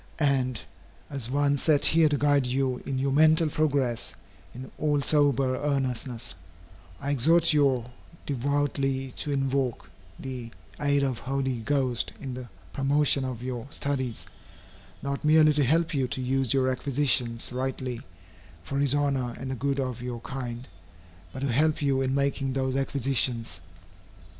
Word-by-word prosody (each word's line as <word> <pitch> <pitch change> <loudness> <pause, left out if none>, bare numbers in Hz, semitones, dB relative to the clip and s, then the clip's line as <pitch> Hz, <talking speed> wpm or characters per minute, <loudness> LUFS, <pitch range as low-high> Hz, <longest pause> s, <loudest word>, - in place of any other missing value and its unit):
And, 130 -6 +1 0.5
as 135 -5 -4
one 145 +1 +2
set 145 0 +3
here 160 -1 +5
to 145 - +1
guide 145 -2 +2
you 130 0 0
in 135 - -2
your 135 +1 0
mental 155 +3 +4
progress, 140 -6 0 0.4
in 130 +4 -9
all 150 -1 +1
sober 140 -3 +2
earnestness, 130 -4 -2 0.7
I 140 - -2
exhort 160 +5 +4
you 135 -5 +3 0.4
devoutly 135 -1 -1
to 145 - -3
invoke 135 -8 -1 0.3
the 125 -3 -6 0.3
aid 145 -1 +2
of 130 -3 0
the - - -11
Holy 130 -1 -2
Ghost 130 0 0
in 130 -2 -6
the 125 -1 -8 0.2
promotion 140 0 +2
of 125 -2 -5
your 125 -1 -4
studies 130 -5 -3 0.8
not 140 0 -3
merely 155 0 +5
to 145 -1 +2
help 165 +5 +2
you 135 -3 +1
to 130 - -4
use 130 -1 0
your 130 -1 +2
acquisitions 125 -3 0
rightly, 130 -1 -3 0.6
for 140 - -3
his 140 -1 +4
honor 135 -4 0
and 130 0 -5
the - - -2
good 140 +2 -1
of 130 -2 -3
your 120 -1 -5
kind, 125 -1 -6 0.6
but 130 - -7
to 140 -2 0
help 155 +5 +2
you 140 -2 +1
in 130 0 0
making 140 -1 0
those 130 -1 -1
acquisitions. 130 - 0
135 Hz, 150 wpm, -27 LUFS, 125-145 Hz, 0.8 s, here